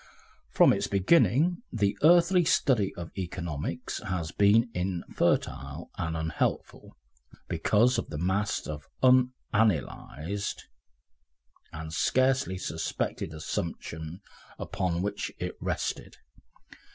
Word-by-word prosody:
From - - +5
its - - -1
beginning 135 - +3
the 100 -3 +1
earthly 175 +3 +6
study 130 - +2
of 85 -1 -7
economics 85 -5 -4
has 85 -4 -3
been 110 +6 +4
infertile 85 -4 -1
and 80 -3 -3
unhelpful, 80 -1 -3 0.5
because 120 +3 +2
of - - -6
the 75 - -5
mass 95 +5 0
of 75 -2 -7 0.2
unanalysed 110 - +1 1.1
and 80 -1 -7
scarcely 130 0 +2
suspected 90 - -3
assumptions 80 +2 -5 0.4
upon 90 -2 -2
which 100 0 -3
it - - -4
rested. - - -3
95 Hz, 95 wpm, -28 LUFS, 85-120 Hz, 1.1 s, earthly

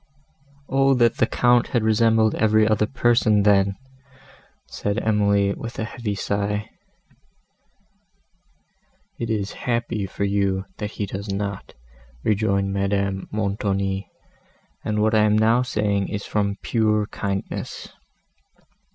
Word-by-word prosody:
"O 135 0 +3
that 120 -2 +3
the - - +3
Count 120 -1 +3
had 120 -3 0
resembled 110 0 +3
every 110 0 +3
other 105 -1 +2
person, 115 -5 +2
then!" 100 -1 +3 0.9
said 100 +1 -3
Emily, 100 -2 +2
with 115 +3 -8
a - - -2
heavy 110 -2 -4
sigh. 100 +2 -2 2.5
"It 115 - -3
is 105 -2 -1 0.2
happy 115 -4 -1
for 100 - -4
you, 100 -1 0
that 105 - -3
he 105 - -3
does 100 +1 -6
not," 100 0 -4 0.5
rejoined 100 -2 +1
Madame 100 -1 -1
Montoni; 100 -2 -2 0.7
"and 105 0 0
what 110 0 +2
I 110 - +5
am 105 0 +3
now 115 +3 +4
saying 105 -5 0
is 105 -1 -5
from 100 -1 -1
pure 105 -2 +1
kindness. 100 -1 -5
105 Hz, 120 wpm, -23 LUFS, 100-110 Hz, 2.5 s, I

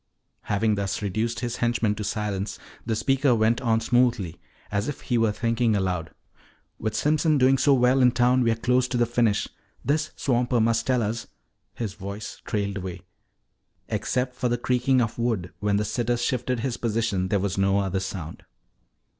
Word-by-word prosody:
Having 105 +2 +1
thus 100 0 -2
reduced 110 +4 -1
his 120 -1 -3
henchman 120 -3 +1
to 105 - -5
silence, 105 -1 -3 0.3
the 115 -1 -1
speaker 135 +2 +2
went 110 +1 +2
on 115 -3 +2
smoothly, 120 -8 +1 0.3
as 100 +1 -1
if 145 - -5
he 120 - -1
were 115 -2 +3
thinking 115 +1 +1
aloud. 90 -4 -1 0.7
"With 110 0 -2
Simpson 155 +1 +2
doing 135 0 +4
so 140 +1 +5
well 125 +1 +3
in 125 - +7
town, 125 +1 +3
we're 115 -2 +2
close 125 +2 +1
to 125 0 -2
the 120 - +3
finish. 115 -3 +1 0.4
This 150 +2 +1
swamper 125 -2 +1
must 115 0 +1
tell 125 -3 +2
us 110 +3 -3 0.2
" - - -50
His 110 -5 -4
voice 100 +1 -7
trailed 100 -3 -2
away. 95 -1 -6 0.9
Except 125 0 -1
for 125 0 -1
the 120 - +1
creaking 125 +1 +2
of 115 0 -2
wood 110 -7 -1
when 105 -1 +1
the 105 - 0
sitter 120 +3 0
shifted 120 0 -1
his 125 -1 -2
position, 110 -5 0
there 100 +2 +1
was 95 0 -2
no 95 0 +3
other 95 -1 0
sound. 90 -4 -6
115 Hz, 180 wpm, -25 LUFS, 100-125 Hz, 0.9 s, in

